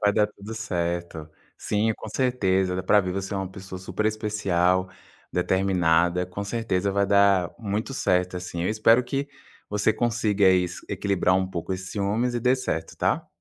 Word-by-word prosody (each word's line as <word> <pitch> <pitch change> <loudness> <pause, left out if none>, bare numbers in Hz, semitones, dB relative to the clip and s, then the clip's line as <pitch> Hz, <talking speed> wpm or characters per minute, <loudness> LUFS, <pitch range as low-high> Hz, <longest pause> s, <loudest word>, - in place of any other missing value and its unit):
vai 105 -1 +3
dar 105 0 +3
tudo 105 +1 -10
certo 85 -6 -3 0.3
Sim, 110 +2 0
com 110 - -8
certeza, 95 -7 +1
dá 95 - -2
para 105 +2 +4
ver, 90 -2 -3
você 95 +1 -4
é - - -1
uma 95 -1 -3
pessoa 95 -1 -8
superespecial, 95 -2 0 0.4
determinada, 90 -1 +2
com 95 +3 -5
certeza 100 -3 -1
vai 100 0 +2
dar 100 -3 +4
muito 110 +4 -3
certo, 90 -3 +1
assim. 90 -1 -5
Eu - - 0
espero 115 +3 +4
que 135 +3 -3 0.4
você 105 +1 +1
consiga 105 -5 +2
isso, 90 -1 0
equilibrar 95 -2 +1
um 95 0 +1
pouco 90 +1 -4
esse 95 0 -5
ciúmes 105 +5 -1
e 120 - -1
dê 125 +2 +3
certo, 80 -11 -3
tá? - - 0
100 Hz, 170 wpm, -25 LUFS, 90-110 Hz, 0.4 s, para